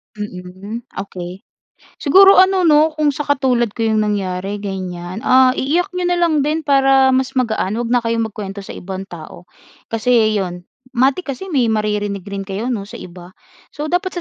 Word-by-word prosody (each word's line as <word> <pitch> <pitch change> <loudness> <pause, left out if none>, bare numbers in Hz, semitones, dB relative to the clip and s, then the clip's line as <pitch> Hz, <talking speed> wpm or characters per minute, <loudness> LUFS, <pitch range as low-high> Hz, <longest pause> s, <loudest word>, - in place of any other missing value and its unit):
Mm, 205 +3 -8 0.2
okey. 180 -1 -9 0.6
Siguro 390 +6 +6
ano, 375 0 +5
'no, 310 0 +4
kung 305 -1 +2
sa 295 +2 -5
katulad 260 -4 +1
ko 230 - -3
'yong 220 -1 +2
nangyari, 200 -2 -2
ganiyan, 185 -1 -5
ah, 255 0 +6
iiyak 345 +8 0
niyo 360 -1 -2
na 355 - +1
lang 335 -3 +2
din 305 +3 0
para 270 -2 +4
mas 265 +1 0
magaan, 220 -5 0
huwag 235 0 -3
na 245 0 +3
kayong 230 -1 -1
magkuwento 200 -1 -7
sa - - -9
ibang 190 +1 -6
tao 170 +1 -10 0.5
kasi 225 -2 +2
'yon, 180 -2 -4 0.3
matik 265 +8 +1
kasi 380 +9 -9
may 265 -7 +2
maririnig 210 -2 -1
rin 200 -1 -6
kayo 205 +6 -3
'no 205 -5 -3
sa - - -12
iba, 180 0 -12 0.4
so 300 +1 -4
dapat 370 +2 -1
230 Hz, 175 wpm, -18 LUFS, 195-285 Hz, 0.6 s, Siguro